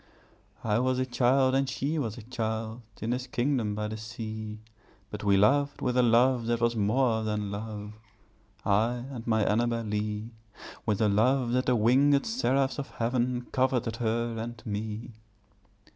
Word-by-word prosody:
I 110 0 +2
was 130 0 +1
a 130 - +1
child 130 +1 +3
and 135 0 +2
she 150 +4 -1
was 115 -5 -3
a 120 - -9
child, 110 -1 -3 0.2
In 115 - -1
this 125 +1 -2
kingdom 120 -4 0
by 105 0 -2
the 110 +1 -5
sea, 110 -1 -6 0.5
But 105 0 -6
we 100 -1 +4
loved 140 +8 +3
with 125 -1 -1
a 125 - +5
love 120 0 +3
that 120 0 +1
was 115 0 +1
more 110 +2 +2
than 105 -2 -2
love, 105 0 -6 0.7
I 110 +4 +2 0.2
and 120 -3 -7
my 110 -2 +3
Annabel 115 +2 +1
Lee; 105 +1 -3 0.6
With 105 -1 +1
a 110 - +4
love 120 +5 +2
that 125 +1 +1
the 125 -1 +3
wing├©d 135 +6 +4
seraphs 140 - +1
of 140 - -5
heaven 120 +1 -1
Coveted 125 -3 +1
her 115 0 -1
and 120 0 -5
me. 110 +2 -4
115 Hz, 165 wpm, -28 LUFS, 110-125 Hz, 0.7 s, a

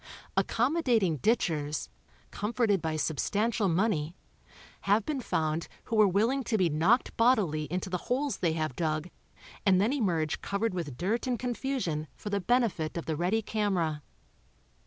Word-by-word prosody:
Accommodating 240 - +2
ditchers, 155 - 0 0.4
comforted 210 -2 0
by 160 -1 -2
substantial 200 +8 0
money, 170 -3 0 0.7
have 205 +2 +3
been 290 -4 -2
found 160 -6 -1 0.2
who 230 - -3
were 215 -1 +6
willing 225 +8 +1
to 225 - +1
be 185 -4 +3
knocked 175 - +2
bodily 205 -11 +3
into 180 +2 -2
the 180 -1 -2
holes 270 +3 0
they 165 -3 +1
have 155 -5 -2
dug 155 +2 -2 0.5
and 190 -2 +4
then 215 +7 +2
emerge 170 - 0
covered 200 +1 -1
with 155 -8 -4
dirt 220 - -1
and 250 -1 0
confusion 245 - -2
for 205 - -7
the 200 -1 0
benefit 205 -8 +1
of 170 - -4
the 160 - -1
ready 185 +8 0
camera. 185 -9 -1
195 Hz, 150 wpm, -29 LUFS, 160-230 Hz, 0.7 s, were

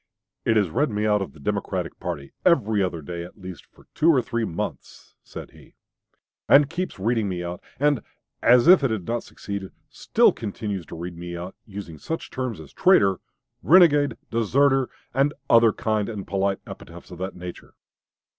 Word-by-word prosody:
"It 115 - +3
has 100 -6 +1
read 145 - +1
me 105 -1 -1
out 105 -1 +2
of 95 - -5
the 80 - -16
Democratic 70 - -3
party 70 -1 -5
every 110 - +3
other 90 -4 -2
day, 85 +3 -6
at 90 - -12
least, 95 -2 -10
for - - -22
two 160 - +3
or 150 -6 +5
three 120 -2 -2
months," 80 - -6
said - - -10
he, - - -19 0.7
"and 145 +1 +6
keeps 180 +2 -4
reading 110 +1 0
me 90 -1 -3
out; 85 0 -6 0.2
and, 145 -4 +2 0.4
as 120 +4 +5
if 180 -4 +8
it 135 - +2
had 110 -6 -3
not 120 0 -2
succeeded, 100 -1 -7 0.2
still - - +3
continues 100 -4 -5
to - - -8
read 85 +1 -6
me 85 0 -7
out, 90 +2 -7
using 95 -7 -8
such 165 - -5
terms 130 -7 -4
as 80 -3 -12
'traitor,' 95 -2 +4 0.4
'renegade,' 150 -6 +5
'deserter,' 130 +4 +2 0.2
and 135 +3 +1 0.2
other 115 -1 +6
kind 110 -1 -1
and 105 -4 -6
polite 95 0 0
epithets 85 +2 -11
of 90 - -10
that 95 +1 -4
nature." 90 0 -10
105 Hz, 180 wpm, -24 LUFS, 90-130 Hz, 0.7 s, if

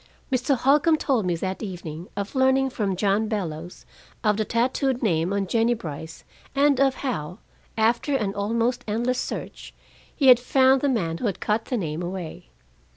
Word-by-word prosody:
Mr. 260 +1 +1
Holcombe 295 +5 +4
told 250 -10 0
me 175 - +1
that 190 +3 -4
evening 175 -4 -6
of 200 0 -4
learning 265 0 +3
from 200 -5 -1
John 205 +3 +1
Bellows 175 -5 -5 0.4
of 210 -2 +3
the 215 +1 -1
tattooed 250 +3 0
name 170 -3 +1
on 200 -1 0
Jennie 230 +4 +2
Brice 160 -5 -8 0.3
and 280 -1 +3
of 270 -1 +3
how, 180 - -3 0.4
after 235 +6 +2
an 210 -6 -1
almost 230 +4 -1
endless 240 +4 0
search, - - -6 0.4
he 275 -4 +4
had 250 -1 +8
found 260 +1 +3
the 285 - +2
man 170 -10 -1
who 245 - -1
had 195 - -3
cut 215 +2 0
the 250 - -2
name 160 -4 -3
away. 180 -2 -6
220 Hz, 170 wpm, -24 LUFS, 185-260 Hz, 0.4 s, had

